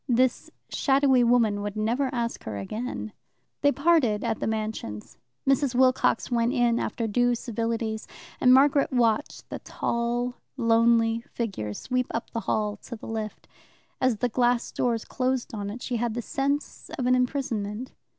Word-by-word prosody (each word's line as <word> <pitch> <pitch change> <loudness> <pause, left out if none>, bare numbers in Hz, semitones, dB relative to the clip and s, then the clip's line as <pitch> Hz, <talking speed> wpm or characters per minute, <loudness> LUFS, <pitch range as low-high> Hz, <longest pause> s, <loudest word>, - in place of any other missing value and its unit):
This 250 +1 +2 0.2
shadowy 270 -2 +3
woman 230 -4 +3
would 205 0 -4
never 235 +6 0
ask 235 -2 -3
her 105 -2 -4
again. 215 - -5 0.5
They 285 - +5
parted 280 -9 +2
at - - -1
the - - -2
Mansions. 215 - -4 0.3
Mrs. 270 -1 +2
Wilcox 255 -1 +3
went 235 +1 +2
in 240 -3 +2
after 230 - -2
due 245 +3 +2
civilities, 225 -1 -3 0.3
and 250 - +5
Margaret 275 +2 +5
watched 240 +1 +1
the - - -4
tall, 240 +1 -2 0.2
lonely 230 -1 +3
figure 195 - -3
sweep 250 - -1
up 230 - -4
the 230 - -2
hall 210 -1 0
to 240 - -9
the 220 - -10
lift. 220 -1 -5 0.5
As 255 -4 +2
the 245 +3 0
glass 245 0 +1
doors 235 -3 0
closed 255 -1 -1
on 205 -2 -4
it 230 +4 -7
she 245 - -2
had 230 -1 -1
the 240 - -3
sense 280 +4 -2
of 255 - -1
an 250 - +4
imprisonment. 250 -3 -1
235 Hz, 160 wpm, -26 LUFS, 220-255 Hz, 0.5 s, They